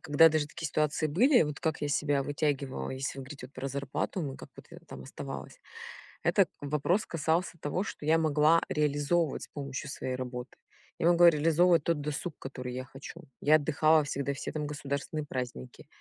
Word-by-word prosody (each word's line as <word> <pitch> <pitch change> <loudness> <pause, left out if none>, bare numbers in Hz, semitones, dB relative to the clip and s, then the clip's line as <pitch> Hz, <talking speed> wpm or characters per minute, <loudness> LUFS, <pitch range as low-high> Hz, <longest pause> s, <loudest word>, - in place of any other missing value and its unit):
когда 160 +2 +6
даже 155 -2 0
такие 165 +1 -6
ситуации 150 +1 0
были, 240 - +5
вот 150 -1 -3
как 160 -2 -1
я 145 - -1
себя 145 -1 +1
вытягивала, 145 -3 -2
если 135 +1 -4
вы - - -5
говорите, 135 -2 -9
вот, 135 - -23
про 135 +1 -4
зарплату 140 +6 -3
мою, 135 -2 -4
как - - -11
вот - - -13
я - - -10
там 65 - -9
оставалась. - - -8 0.7
Этот - - +3
вопрос 150 +8 0
касался 165 +2 -1
того, 165 +7 -1
что 150 - -7
я 160 +1 +4
могла 155 +1 +4
реализовывать 150 +2 +1
с - - -8
помощью 140 -1 -5
своей 130 -1 -3
работы. 125 0 -6 0.4
Я 165 - +2
могла 175 0 +7
реализовывать 165 +1 +3
тот 165 -3 0
досуг, 150 +2 -4
который 125 -2 -6
я 130 0 -5
хочу. 135 +6 -10 0.2
Я 155 +2 +5
отдыхала 155 +1 +3
всегда 140 0 -2
все, 135 - -5
там, 150 -1 -3
государственные 145 +1 -4
праздники. 125 - -6
145 Hz, 185 wpm, -30 LUFS, 140-160 Hz, 0.7 s, могла